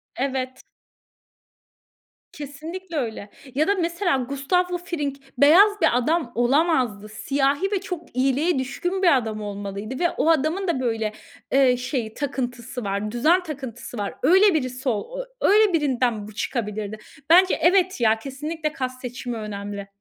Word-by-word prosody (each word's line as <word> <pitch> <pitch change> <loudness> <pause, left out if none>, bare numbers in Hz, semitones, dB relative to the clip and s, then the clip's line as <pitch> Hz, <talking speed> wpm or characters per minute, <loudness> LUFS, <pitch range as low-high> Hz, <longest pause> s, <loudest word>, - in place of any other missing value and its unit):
Evet. 260 -1 -3 1.7
Kesinlikle 320 +5 -7
öyle. 220 -5 -4 0.3
Ya 310 +4 +2
da 405 - +3
mesela 345 -3 0
Gustavo 285 +8 0
Fring 315 -6 -3 0.2
beyaz 390 +9 +6
bir 245 - +4
adam 295 0 0
olamazdı. 245 -5 +1
Siyahi 280 - 0
ve 395 -2 0
çok 350 -8 -7
iyiliğe 270 +4 +2
düşkün 355 +9 -3
bir 335 -7 +6
adam 220 -3 -3
olmalıydı 205 +4 -5
ve 345 -1 +3
o 325 - 0
adamın 325 +5 +1
da 310 -7 0
böyle, 225 -3 -1 0.4
eee, 260 -2 +4
şey 250 -3 -3
takıntısı 250 -4 -4
var, 200 +2 -2
düzen 320 +10 +3
takıntısı 260 -6 -7
var. 205 -1 -3
Öyle 380 +6 +6
birisi 255 -2 -1
o - - -3 0.2
öyle 420 -2 +5
birinden 250 -8 0
bu 215 - -11
çıkabilirdi. 210 -2 -3 0.3
Bence, 365 +2 +6
evet, 365 -3 +3
ya, 220 0 +3
kesinlikle 305 +4 -4
cast 255 0 -3
seçimi 245 -1 -5
önemli. 200 -1 -6
270 Hz, 140 wpm, -23 LUFS, 235-335 Hz, 1.7 s, beyaz